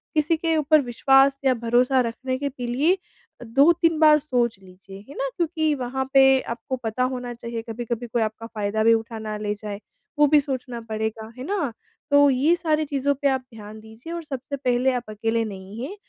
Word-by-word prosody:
किसी 310 +2 +2
के 325 0 0
ऊपर 305 0 +4
विश्वास 270 +2 +3
या 260 - +5
भरोसा 245 +2 +2
रखने 255 +2 -3
के 280 +1 -2
पी 250 -2 -6
लिए 300 +10 +2 0.4
अ, - - -7
2-3 320 +6 +3
बार 305 -1 +6
सोच 245 -7 -1
लीजिए, 190 +1 -13
है - - -10
ना? - - -1
क्योंकि 315 -2 0
वहाँ 265 0 -3
पे 270 -1 +6
आपको 235 +3 -4
पता 225 +3 -1
होना 245 -1 -5
चाहिए 235 -1 -6
कभी-कभी 235 +1 -4
कोई 230 0 -1
आपका 220 +1 -3
फ़ायदा 215 -1 -2
भी 230 0 +6
उठा 225 0 -2
ना 215 -1 -5
ले 210 0 -2
जाए 205 -1 -7 0.4
वो 295 - +6
भी 300 +1 +5
सोचना 255 -4 -5
पड़ेगा। 220 0 -4
है 255 - -6
ना? 345 - -1 0.4
तो 285 0 +6
ये 275 +6 +3
सारी 310 -3 0
चीज़ों 285 0 0
पे 280 - +3
आप 265 -1 0
ध्यान 215 0 -10
दीजिए 220 +9 -10
और 340 -1 -5
सबसे 275 -1 -5
पहले 255 -1 +1
आप 245 - -2
अकेले 225 +2 -1
नहीं 195 +1 -8
हैं 385 +9 -6
250 Hz, 200 wpm, -23 LUFS, 225-285 Hz, 0.4 s, बार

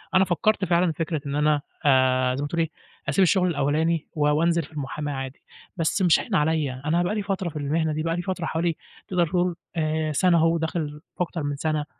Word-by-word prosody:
أنا 190 0 +6
فكّرت 195 +3 +1
فعلًا 175 0 +2
في 155 - -10
فكرة 160 -2 -1
إن 140 0 -3
أنا 150 -1 +2 0.2
آآ 130 -2 +4
زي 135 - -3
ما 145 - -1
تقول 170 +2 -1
إيه، 160 - 0 0.4
أسيب 185 +7 +3
الشُغل 180 0 +3
الأولاني 155 +1 0
و 150 -2 +1
وأنزل 165 +3 +2
في 150 - -13
المُحاماة 145 0 -4
عادي، 135 0 -6 0.4
بس 165 +4 0
مش 175 -3 +5
هاين 210 - -3
عليّا، 150 -5 +1
أنا 170 +3 +2
بقى 190 +4 -1
لي 210 - -1
فترة 190 -3 -2
في - - -14
المهنة 155 +2 0
دي، 155 +1 -2
بقى 165 0 0
لي 175 - -2
فترة 180 -3 -3
حوالي 165 +1 0 0.3
تقدر 175 -2 +1
تقول 175 +1 0 0.2
آآ 155 -1 0
سَنة 175 +3 +4
أهو 165 +1 +4
وداخل 160 -2 -3 0.2
في 180 - +2
أكتر 165 -2 -5
من 145 0 -2
سَنة، 155 0 -1
160 Hz, 225 wpm, -25 LUFS, 150-175 Hz, 0.4 s, أنا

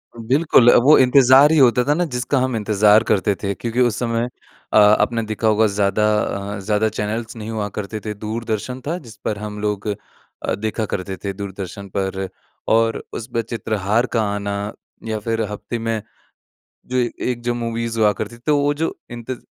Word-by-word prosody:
बिल्कुल, 120 +1 +4
वो 150 +4 +7
इंतज़ार 130 +2 +6
ही 160 - +3
होता 125 -3 +5
था 145 - +3
ना, 175 +3 0
जिसका 130 -1 -1
हम 130 -1 0
इंतज़ार 105 0 +4
करते 100 -2 +1
थे 100 0 0
क्योंकि 115 +5 -4
उस 120 -3 +2
समय 115 0 -1 0.4
अ, - - +5
आपने 105 +2 +4
देखा 110 +1 -2
होगा, 110 +1 +4
ज़्यादा 100 0 +1 0.5
अ, - - -6
ज़्यादा 105 +2 +1
चैनल्स 110 +2 -4
नहीं 110 -1 -7
हुआ 110 -2 -2
करते 105 +1 -4
थे। 105 - -2
दूरदर्शन 110 +3 -4
था, 170 +3 -1
जिस 115 -10 -12
पर 105 - -1
हम 105 0 -6
लोग 105 -1 -2
अ, 105 -1 -6
देखा 110 +2 -2
करते 95 0 -3
थे, 100 -1 -2
दूरदर्शन 100 0 -7
पर, 95 0 -2 0.4
और 115 0 +2
उस 115 - -5
पे 115 - +1
चित्रहार 110 0 -1
का 115 - +3
आना 100 0 -3 0.5
या 110 -1 -2
फिर 115 +1 -2
हफ़्ते 105 +3 -5
में 115 -1 -2 0.9
जो 130 - -2
एक 120 0 -2
जो 120 0 0
मूवीज़ 115 -1 -3
हुआ 105 -1 +5
करती 110 +4 -6
थी। 120 - -19
तो 150 -1 +3
वो 145 +1 +2
जो 160 +3 -2 0.2
इंतज़ 120 +1 -6
110 Hz, 185 wpm, -20 LUFS, 105-120 Hz, 0.9 s, वो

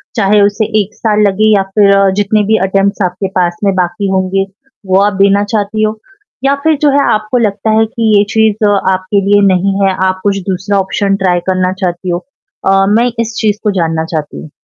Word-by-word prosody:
चाहे 210 -1 +2
उसे 205 +2 +1 0.2
1 200 - -8
साल 215 -2 0
लगे 215 +2 +2
या 195 - +2
फिर 200 -2 +4
जितने 210 +1 +1
भी 220 - +4
अटेम्प्ट्स 195 +1 0
आपके 185 +2 -3
पास 175 -1 0
में 195 -1 +2
बाकी 190 +2 -1
होंगे 190 0 0 0.4
वो 190 +1 +2
आप 205 0 +1
देना 200 +1 +3
चाहती 215 +1 -1
हो 215 0 -2 0.4
या 275 +1 +2
फिर 320 -1 +3
जो 295 - +4
है 280 0 +2
आपको 215 +3 -1
लगता 215 -2 -1
है 225 - +3
कि 220 -1 +1
ये 200 - +4
चीज़ 220 -1 +1
आपके 190 0 0
लिए 205 0 +4
नहीं 190 +1 +1
है। 195 -1 +2
आप 185 0 -2
कुछ 200 -1 0
दूसरा 195 +2 -1
ऑप्शन 195 +1 -1
ट्राई 180 -1 +2
करना 185 0 0
चाहती 180 0 -3
हो। 175 - -1 0.5
अ, 195 0 +3
मैं 235 +4 +2
इस 230 0 -2
चीज़ 210 -1 0
को 210 - +1
जानना 160 -1 -1
चाहती 155 -3 -5
हूँ। 155 - -11
200 Hz, 205 wpm, -12 LUFS, 190-215 Hz, 0.5 s, फिर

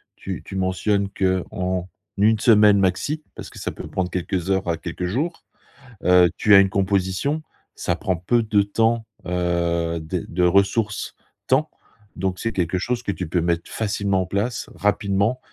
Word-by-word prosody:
tu - - -6
tu - - -9
mentionnes 100 +2 0
qu'en 95 -1 -1 0.3
1 110 +2 +4
semaine 105 -3 +6
maxi- 100 +12 0
parce - - -8
que - - -12
ça - - -3
peut - - -8
prendre 90 -1 -2
quelques 90 0 -2
heures 95 -1 +1
à 85 - 0
quelques 85 +2 -5
jours- 145 - -2 0.6
heu, 90 0 +6
tu 105 - +4
as - - +10
une 95 -1 +4
composition, 100 +10 0 0.3
ça - - -1
prend 95 - -1
peu 115 +8 +1
de 105 -2 +3
temps, 115 +2 +1 0.2
heu, 85 -2 0
des 80 +2 -3
de 90 +1 -1
ressources 100 +4 +1 0.3
temps, - - +2 0.5
donc 95 0 -2
c'est 115 - -1
quelque 90 0 0
chose 125 +5 -2
que 100 - -1
tu 95 -2 -5
peux 85 +1 +1
mettre 85 0 -1
facilement 100 -3 0
en - - -7
place, 100 +6 -2
rapidement 100 +3 +1
95 Hz, 170 wpm, -22 LUFS, 90-105 Hz, 0.6 s, as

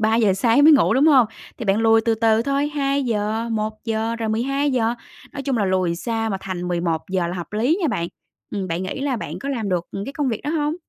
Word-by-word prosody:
3:00 220 -2 +3
sáng 230 +8 +3
mới 315 - +9
ngủ, 270 -5 +4
đúng 275 +4 +4
hông? 265 -7 +6 0.3
Thì 235 - -5
bạn 200 +1 +2
lùi 225 0 +4
từ 225 0 +1
từ 225 0 +2
thôi, 280 +2 0
2:00, 235 -6 -1
1:00, 220 +1 -2
rồi 225 -1 -2
12:00, 250 0 0 0.4
nói 280 - -5
chung 270 -3 -1
là 210 - +1
lùi 185 -3 0
xa 225 +2 -2
mà 195 - -1
thành 180 -2 -4
11:00 175 +1 -1
là 175 - -4
hợp 175 +2 -7
lý 250 - +1
nha 320 - +2
bạn. 170 -8 -2 0.4
Ừm, 195 -2 -3
bạn 170 +2 -2
nghĩ 190 +7 -4
là 275 -2 -1
bạn 215 - -6
có 275 - -6
làm 230 -7 -2
được, 180 -2 0
ừm, 200 +1 -5
cái 275 - -6
công 285 -2 -1
việc 225 -4 -2
đó 295 - -1
hông? 300 -1 0
225 Hz, 235 wpm, -22 LUFS, 195-275 Hz, 0.4 s, mới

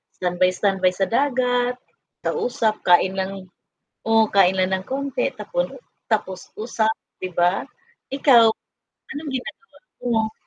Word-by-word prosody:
standby, 180 0 +1
standby 190 -2 +1
sa 190 0 0
dagat, 250 -1 +1 0.5
kausap, 230 -4 0
kain 185 +2 +4
lang 190 0 -4 0.6
oo, 225 -1 +4
kain 190 -1 +4
lang 185 0 +1
ng 190 - -7
konti, 280 - -2
tapon - - -3 0.3
tapos 190 -4 -2
usap 220 -1 0 0.3
'di 185 -1 -5
ba? 175 +2 +2 0.5
Ikaw, 265 -4 +6 0.7
anong 300 +1 -6
ginagawa 265 - -6 0.6
mo? 220 - -13
220 Hz, 120 wpm, -22 LUFS, 185-250 Hz, 0.7 s, Ikaw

